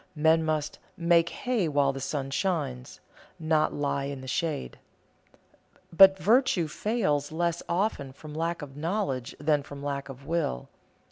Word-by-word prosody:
Men 160 +1 +4
must 155 -2 -2 0.2
"make 170 0 +3
hay 240 -8 -1
while 140 -2 +2
the 135 - -6
sun 135 0 -3
shines," 140 - -2 0.4
not 155 -1 +1
lie 140 -1 -1
in 140 -1 -5
the 130 - -9
shade. 140 - -2 1.1
But 190 +2 +8
virtue 205 - +3
fails 155 -6 -1
less 170 +1 -1
often 170 -6 -1
from 150 +3 -11
lack 165 +1 -2
of 135 -2 -10
knowledge 150 - -2
than 150 0 +2
from 140 0 -10
lack 140 -1 -3
of 135 +1 -10
will. 160 - -2
155 Hz, 145 wpm, -28 LUFS, 140-170 Hz, 1.1 s, But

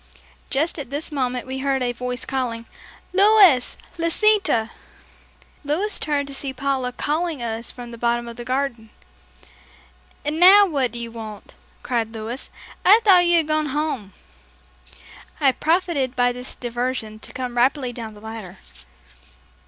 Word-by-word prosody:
Just 305 +4 +1
at 275 - -6
this 290 +4 -4
moment 255 -4 -2
we 260 +1 -5
heard 270 -1 0
a 245 - 0
voice 250 0 -4
calling, 240 -4 -3 0.5
"Louis! 390 - +5 0.2
Lisita!" 335 - +2 0.9
Louis 350 +9 0
turned 290 -2 -1
to 280 - -7
see 270 0 -4
Paula 265 -1 -1
calling 305 +1 -2
us 230 0 -3
from 245 -1 -10
the 235 - -10
bottom 235 0 0
of 235 - -8
the 240 - -7
garden. 255 -3 -2 1.4
"And 300 +2 -1
now 395 +3 +8
what 275 -9 0
do 240 - -8
you 235 -1 -5
want?" 220 -3 -9 0.3
cried 230 -3 -2
Louis. 225 +4 -6 0.3
"I 415 +4 +7
thought 365 -4 +6
you 345 0 +5
had 320 -2 +1
gone 310 -1 +1
home." 275 -9 -3 1.3
I 275 -3 +4
profited 310 -4 0
by 245 0 +3
this 250 +1 -4
diversion 240 -3 -4
to - - -10
come 250 -2 -5
rapidly 255 +1 +1
down 225 -3 -7
the 205 - -14
ladder. 220 -4 -8
260 Hz, 150 wpm, -22 LUFS, 235-305 Hz, 1.4 s, now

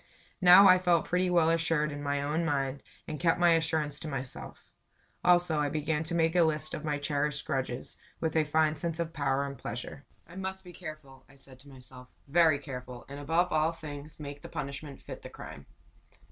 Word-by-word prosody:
Now 185 +2 +9
I 185 -1 +7
felt 175 -2 +2
pretty 180 +1 +1
well 170 -2 +4
assured 165 -2 +1
in 145 0 -6
my 140 0 -1
own 155 +4 0
mind, 140 -3 -1 0.3
and 155 -1 -5
kept 165 0 +2
my 175 -1 +5
assurance 160 -3 +1
to - - -7
my 135 -3 -3
self. 130 - -9 0.6
Also 175 -3 +4
I 145 -1 +1
began 155 +1 -1
to 170 +2 -3
make 165 0 +2
a 175 - +5
list 155 -1 +1
of - - -5
my 150 -2 -1
cherished 145 0 -1
grudges, 130 -2 -3 0.2
with 160 -1 -2
a 160 - +4
fine 155 +1 +2
sense 165 +1 -3
of 165 -1 -2
power 140 -2 0
and 140 -1 -7
pleasure. 125 +3 -6 0.2
"I 175 +3 -13
must 190 0 -3
be 180 -1 -12
careful," 155 -6 -10
I 135 - -18
said 135 -1 -13
to 140 +2 -14
myself; 130 -1 -12 0.2
"very 160 0 +4
careful; 125 -3 -8
and, 140 +1 -7
above 165 +5 +1
all 155 +1 +2
things, 150 -1 -9
make 145 -1 -7
the - - -10
punishment 140 -2 -6
fit - - -9
the - - -9
crime." 70 +1 -10
150 Hz, 205 wpm, -30 LUFS, 140-165 Hz, 0.6 s, Now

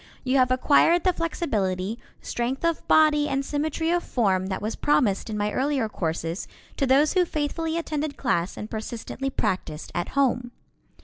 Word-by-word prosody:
You 265 +1 +2
have 255 -1 +4
acquired 290 +6 +4
the 370 - +3
flexibility, 220 - -2 0.2
strength 255 +6 -2
of 335 -1 -1
body 300 -1 +4
and 275 0 -1
symmetry 315 +3 -1
of 350 0 +2
form 190 - 0
that 190 - -2
was 215 +2 -3
promised 225 -8 +1
in 215 - -3
my 210 0 0
earlier 265 -2 0
courses 165 -2 -3 0.3
to 275 - +1
those 280 +4 +4
who 365 - +4
faithfully 320 +1 -2
attended 305 -3 -3
class 175 -8 -1
and 210 - -5
persistently 230 +4 -4
practiced 175 - -3
at 175 - -2
home. 245 -3 +1
265 Hz, 165 wpm, -25 LUFS, 210-305 Hz, 0.3 s, have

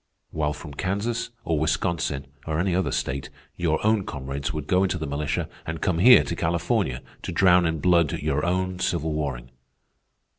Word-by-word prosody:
While 75 -1 -1
from 75 -1 -9
Kansas, 100 - -2 0.2
or 80 -2 +1
Wisconsin, 80 -2 -1 0.2
or 80 0 -1
any 90 0 +1
other 95 +1 +1
state, 70 +1 -2 0.3
your 80 -3 0
own 110 -2 +3
comrades 70 -2 -4
would 75 -2 -4
go 90 +4 +2
into 95 -2 +1
the 80 - -4
militia 70 +1 -2 0.2
and 80 0 -5
come 85 -2 0
here 125 +7 +8
to 85 - -3
California 85 - 0 0.2
to - - -5
drown 90 -2 +5
in 80 0 -1
blood 85 -4 +3
your 75 -1 -1
own 90 +1 -1
civil 80 -3 0
warring." 65 -5 -3
80 Hz, 175 wpm, -25 LUFS, 75-90 Hz, 0.3 s, here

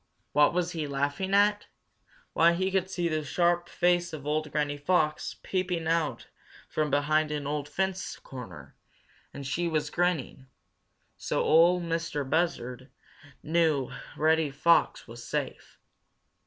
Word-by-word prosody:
What 145 0 +5
was 175 0 -1
he 160 -4 -3
laughing 145 +8 -1
at? 205 +1 +3 0.7
Why, 170 +1 +5
he 190 +2 -1
could 190 -1 0
see 175 -2 -1
the 155 -2 -1
sharp 175 +4 +1
face 175 -1 +1
of 145 -3 -7
old 150 0 -1
Granny 145 0 -1
Fox, 155 -1 0
peeping 180 -3 -2
out 165 -2 0 0.4
from 155 -1 -1
behind 150 +2 +2
an 150 -1 -3
old 145 0 -3
fence 190 +4 -2
corner, 95 - -10 0.6
and 140 - -8
she 170 +6 -1
was 155 -2 -1
grinning. 170 -7 -1 0.7
So - - -1
Ol' 175 +3 +5
Mistah 165 -4 -2
Buzzard 130 -5 -1 0.5
knew 155 -5 +1 0.3
Reddy 160 0 +3
Fox 160 +5 +2
was 120 +1 -10
safe. - - -5
155 Hz, 135 wpm, -28 LUFS, 145-175 Hz, 0.7 s, What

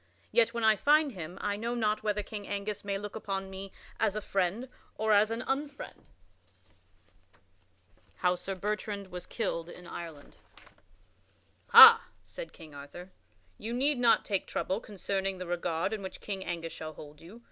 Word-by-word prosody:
Yet 230 -1 +4
when 235 -1 -3
I 220 0 +6
find 300 +2 +4
him, 180 -3 -8
I 205 - -1
know 230 +3 -3
not 215 -2 0
whether 210 -1 -1
King 205 0 -7
Angus 205 0 -4
may 200 -1 -2
look 205 +1 -7
upon 195 -3 -4
me 190 0 -7 0.3
as 215 -2 +1
a - - 0
friend 195 +6 -1 0.3
or 220 0 0
as 210 +1 +5
an 230 +1 -3
unfriend." 280 +2 -2
[Sidenote: - - -10 2.1
How 180 -1 +2
Sir 190 +2 -5
Bertrand 205 0 -4
was 180 0 -7
killed 170 -7 -3
in 180 +1 -11
Ireland] 165 -4 -9 1.3
"Ha," 460 0 +10 0.2
said - - -8
King 160 -3 -14
Arthur, 145 +6 -10 0.5
"you 225 +2 -5
need 270 +2 +1
not 240 -2 +4
take 200 -3 -1
trouble 190 +3 -2
concerning 195 -3 -3
the 185 - -6
regard 175 +2 -1
in 215 - -4
which 190 - -7
King 195 -2 -5
Angus 165 -1 -4
shall 155 0 -7
hold 150 0 -12
you. 185 +8 -13
200 Hz, 170 wpm, -30 LUFS, 180-220 Hz, 2.1 s, Ha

